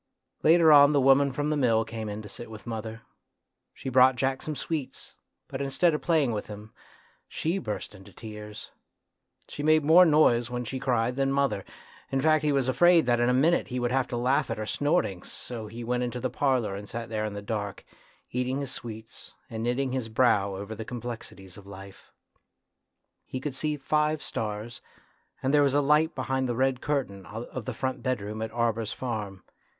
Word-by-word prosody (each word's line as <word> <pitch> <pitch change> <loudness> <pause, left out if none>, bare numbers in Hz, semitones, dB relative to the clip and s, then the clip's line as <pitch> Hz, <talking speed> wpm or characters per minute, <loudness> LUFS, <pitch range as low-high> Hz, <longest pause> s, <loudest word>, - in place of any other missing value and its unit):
Later 165 0 +6
on 145 0 +8
the 145 - +4
woman 135 +1 +5
from 145 +3 -2
the - - +1
mill 115 -5 +2
came 110 -1 -5
in 105 +1 -6
to - - -9
sit 110 +3 -9
with 110 -1 -10
mother. 115 0 -6 0.7
She - - -9
brought 130 0 +5
Jack 135 +1 -1
some 155 - -4
sweets, 150 -2 -5 0.3
but 135 - -5
instead 140 +5 +2
of 150 - -2
playing 155 -7 +2
with 105 -2 -4
him 105 +1 -10 0.5
she 170 +5 -2
burst 105 - -5
into 100 0 -14
tears. 105 0 -9 0.8
She - - -7
made 155 +1 +4
more 165 +5 +7
noise 150 -8 +4
when 125 0 -4
she 130 +3 -4
cried 125 -1 0
than 135 0 +1
mother; 140 -8 0 0.5
in 135 - +1
fact 155 +2 +3
he 150 - +2
was 135 -2 +1
afraid 165 +5 +5
that 120 -1 +2
in 120 +1 +3
a - - +4
minute 160 +6 +3
he 125 0 -3
would 120 0 -1
have 130 0 +1
to 120 - -4
laugh 125 +3 +1
at - - -2
her 110 - -3
snortings, 145 - -1
so 115 -3 -6
he 115 +3 -8
went 125 +1 -1
into 125 0 -3
the 130 +1 -2
parlour 130 -8 0
and 100 +1 -8
sat 115 0 -5
there 110 -1 -2
in 105 -1 -3
the 100 - -6
dark, 100 -1 -4 0.5
eating 125 +2 -1
his 140 -2 -4
sweets, 110 -3 -9 0.2
and 110 -1 -4
knitting 125 +3 0
his 130 -3 -3
brow 105 -4 +2
over 100 +3 -6
the 110 +1 -6
com 120 +2 -6
plexities 110 -6 -8
of 100 - -16
life. 95 0 -12 1.1
He 130 - -6
could 140 +1 -4
see 150 +3 -2
five 150 +2 0
stars, 110 +2 -5 0.6
and 135 +2 +1
there 145 - +6
was 140 -1 +2
a - - +5
light 150 +3 +3
behind 130 -1 -1
the 120 - -1
red 130 0 +1
curtain 130 -10 -2
of 115 +4 -7
the 130 - -3
front 130 +1 -3
bedroom 110 -4 -3
at 110 - -2
Arber's 115 -2 -1
farm. 105 -6 -5
125 Hz, 200 wpm, -27 LUFS, 110-140 Hz, 1.1 s, on